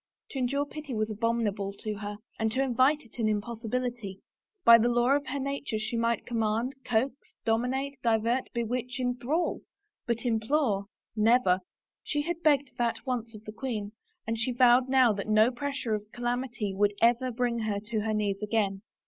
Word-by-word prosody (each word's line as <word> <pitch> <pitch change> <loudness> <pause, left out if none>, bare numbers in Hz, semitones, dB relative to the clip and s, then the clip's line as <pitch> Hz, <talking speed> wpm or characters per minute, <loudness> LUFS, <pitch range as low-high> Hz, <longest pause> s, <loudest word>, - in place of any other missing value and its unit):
To 270 - -4
endure 275 +3 0
pity 290 -3 -7
was 215 0 -1
abominable 215 -3 -1
to 215 +1 -5
her, 205 0 -5 0.2
and 220 -1 +1
to 265 +2 +2
invite 265 +4 +3
it 240 -1 -15
an 220 -2 +2
impossibility. 230 -1 -3 0.5
By 230 0 +10
the 235 +2 +3
law 240 +3 +3
of 285 -1 -2
her 285 - -2
nature 275 -3 -2
she 215 +2 -3
might 230 0 0
command, 230 +2 0
coax, 245 +2 +1 0.3
domi 225 +2 +2
nate, 270 +1 -3
divert, 230 +2 +1
bewitch, 245 +2 -2
enthrall; 250 +7 -1 0.5
but 235 0 -1
implore 225 -2 +1 0.2
— - - -55 0.2
never! 190 -7 +4 0.4
She 295 -1 -1
had 340 +1 -3
begged 285 -4 +3
that 235 +2 -1
once 235 -3 -3
of 215 0 -12
the 215 - -6
queen 215 -3 -4 0.3
and 225 0 -2
she 250 +2 0
vowed 250 +1 +5
now 260 -4 +5
that 200 0 -4
no 215 +3 +5
pressure 275 -3 -3
of 210 0 -4
calamity 240 -4 -2
would 205 +1 +2
ever 240 +2 +3
bring 240 0 0
her 215 -2 -1
to 215 +2 -3
her 215 +1 -1
knees 205 -1 -1
again. 205 -2 0
235 Hz, 180 wpm, -29 LUFS, 215-255 Hz, 0.5 s, By